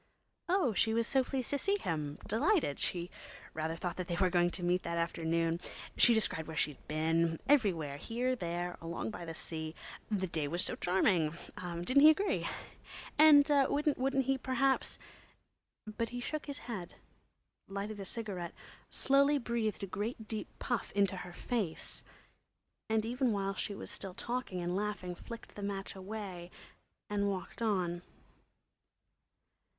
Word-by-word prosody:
Oh, 350 - +3
she 220 +2 +2
was 230 0 +2
so 265 +2 +3
pleased 260 -1 -2
to 285 - +1
see 400 +5 +2
him—delighted! 210 - 0
She 175 -1 -1 0.4
rather 160 +1 -2
thought 175 +1 -4
they 175 -1 -2
were 185 0 +2
going 175 -1 +4
to 175 +1 -3
meet 180 +1 +2
that 170 0 -3
afternoon. 165 0 0 0.4
She 235 - +7
described 180 -7 +3
where 160 -1 -6
she'd 145 -2 -1
been—everywhere, 165 - +2
here, 245 - -1
there, 175 -3 -3
along 170 +6 -3
by 175 - -7
the 165 -1 -6
sea. 160 -1 -5 0.3
The 200 -3 0
day 160 -4 -1
was 175 +5 +1
so - - 0
charming—didn't 175 - +1
he 305 - +10
agree? 390 +6 +2 0.7
And 300 -2 +9
wouldn't 275 -2 +2
he, 270 0 +1
perhaps?... 260 +1 +1 0.9
But 220 +1 -3
he 245 - -5
shook 305 +5 -4
his 285 -1 -4
head, 210 -8 -5 0.7
lighted 200 +2 -4
a 195 - -5
cigarette, 190 -5 -3 0.3
slowly 280 +2 +4
breathed 235 -5 -1
a - - +1
great 215 +4 -4
deep 220 -1 -4
puff 245 -4 -2
into 200 -2 +2
her 180 - -7
face, 200 -3 -3 0.9
and 220 0 +2
even 250 +1 +1
while 195 -1 0
she 200 +1 -3
was - - -7
still 190 -2 -5
talking 240 -7 -3
and 175 +1 -1
laughing, 205 -3 -2
flicked 230 +6 -10
the 205 - -8
match 200 -1 -3
away 190 -3 -6 0.6
and 200 -1 +1
walked 190 +3 -5
on. 180 -6 0
200 Hz, 145 wpm, -33 LUFS, 175-245 Hz, 0.9 s, he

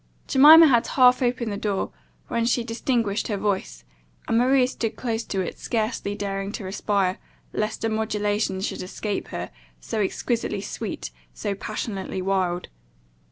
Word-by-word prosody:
Jemima 310 +5 +9
had 240 -6 +4
half 250 -1 +5
opened 240 -2 0
the 200 - -3
door, 200 -2 -2 0.4
when 235 -1 0
she 240 0 +2
distinguished 230 -2 -1
her 210 - -1
voice, 190 - -2 0.4
and - - +1
Maria 255 +1 +4
stood 225 -3 -3
close 230 -2 -2
to 195 - -2
it, 180 - -5
scarcely 220 -3 -2
daring 195 -1 -3
to 225 - -5
respire, 190 -1 0 0.3
lest 215 +1 -2
a 225 - +1
modulation 210 -3 -1
should 195 - -3
escape 195 +2 -4
her, 90 +1 -5 0.3
so 215 - -3
exquisitely 210 0 -1
sweet, 195 - -5 0.2
so 200 - -2
passionately 200 -1 -4
wild. 185 -2 0
210 Hz, 150 wpm, -24 LUFS, 195-235 Hz, 0.4 s, Jemima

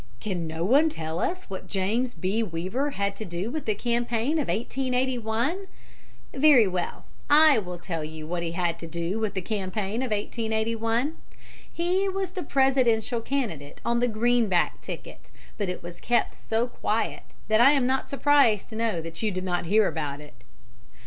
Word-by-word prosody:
Can 180 -5 -3
no 160 +2 -3
one 285 +9 +5
tell 160 - -4
us 370 - -1
what 190 -1 -7
James 220 +7 0
B. 200 +4 0
Weaver 200 - -2
had 200 -6 -2
to 220 - -5
do 180 +4 -4
with 310 +1 -4
the 215 - +2
campaign 240 +5 0
of 290 - -1
1881? 250 - -1 0.7
Very 270 -6 +6
well; 180 -2 -3 0.2
I 300 -3 +7
will 180 -3 -6
tell 165 -2 -4
you 155 0 -7
what 175 +2 -3
he 165 -1 -3
had 170 -1 -1
to 165 - -7
do 170 +5 -2
with 215 -3 -2
the 190 - -2
campaign 205 +2 -2
of 260 - -2
1881. 225 +5 -1 0.5
He 365 +3 0
was 385 -1 -2
the 370 -1 -4
Presidential 255 -5 +2
candidate 215 - -3
on 235 0 +2
the 245 - +2
Greenback 225 -4 +2
ticket, - - -9 0.3
but 200 -3 -1
it 180 - -5
was 175 0 -9
kept 240 0 +1
so 225 +2 -1
quiet 225 -2 -2 0.3
that 220 +1 +4
I 275 +4 +8
am 275 -4 +2
not 265 +1 0
surprised 275 -7 +3
to 220 - -8
know 220 -6 0
that 165 0 -7
you 220 - +1
did 185 -2 -3
not 175 -2 -1
hear 210 +3 +4
about 145 -3 -3
it. 150 -3 -13
220 Hz, 175 wpm, -26 LUFS, 180-255 Hz, 0.7 s, I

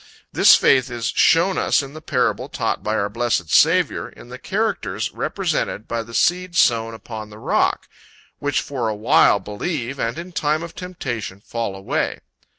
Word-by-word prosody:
This - - +7
faith 130 -1 +3
is 120 -2 -5
shown 175 +3 +4
us - - +2
in 140 +1 -9
the 155 - -9
parable - - 0
taught - - -2
by 105 +1 -1
our 100 - 0
blessed 110 -6 -1
Saviour, - - +3
in 120 - -15
the 125 +1 -9
characters 115 - -2
represented 105 - -2
by 115 0 -2
the 115 +1 -9
seed 180 0 +1
sown 115 -5 +3
upon 110 -1 -8
the 105 - -12
rock, - - 0 0.5
"which 145 -2 0
for 125 -5 -3
a 110 - -2
while 105 -1 +4
believe, 125 - -4
and 115 +5 -2
in 175 +2 -7
time 155 -1 0
of 170 -1 -8
temptation 120 - -5
fall 115 -1 -4
away." 95 0 -2
120 Hz, 170 wpm, -21 LUFS, 110-155 Hz, 0.5 s, This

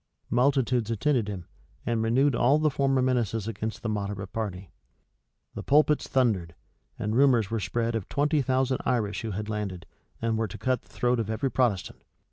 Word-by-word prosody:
Multitudes 125 -2 +2
attended 115 0 +1
him, 95 -4 -5 0.4
and 115 -1 0
renewed 130 +5 +3
all 135 +6 +4
the 155 -1 +2
former 135 -1 +2
menaces 115 -4 0
against 110 0 -4
the - - -2
moderate 100 -2 -4
party.[*] 95 -5 -4 0.8
The - - -5
pulpits 150 +1 +3
thundered; 100 -11 +1 0.4
and 105 0 -2
rumors 120 -6 +4
were 115 - 0
spread 115 +4 -1
of 110 -4 -3
twenty 145 +1 +2
thousand 130 0 +1
Irish 105 -7 0
who 115 - -4
had 105 +1 -4
landed, 100 -5 -4 0.3
and 115 -1 0
were 110 - 0
to 90 - -8
cut 130 -1 0
the - - -27
throat 125 0 0
of 110 -2 -2
every 125 +4 -1
Protestant. 115 -8 0
115 Hz, 175 wpm, -27 LUFS, 105-130 Hz, 0.8 s, all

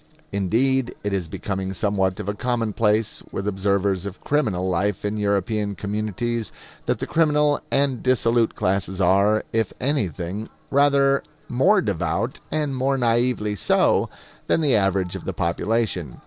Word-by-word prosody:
Indeed, 120 +7 +1
it 105 -1 -1
is 95 -4 -1
becoming 95 +3 -4
somewhat 95 -2 0
of 105 - -5
a 100 - 0
commonplace 110 -2 0
with 100 - -4
observers 100 -1 0
of 100 - -8
criminal 105 -11 0
life 95 +3 0
in 105 +1 -1
European 100 0 0
communities 110 +2 -3 0.4
that - - +1
the - - -3
criminal 150 -2 +2
and 135 -3 +1
dissolute 120 -2 +2
classes 95 0 -1
are, 100 +3 +3
if 110 -3 0
anything, 105 - -2 0.2
rather 140 -1 +4 0.3
more 185 +11 +3
devout, 95 +5 -1
and 150 -3 -1
more 135 +1 +1
naively 120 -3 +1
so, 95 - +2 0.4
than - - +2
the 145 -4 +3
average 95 -3 +1
of - - -6
the - - -3
population. 90 - -1
105 Hz, 140 wpm, -23 LUFS, 95-125 Hz, 0.4 s, rather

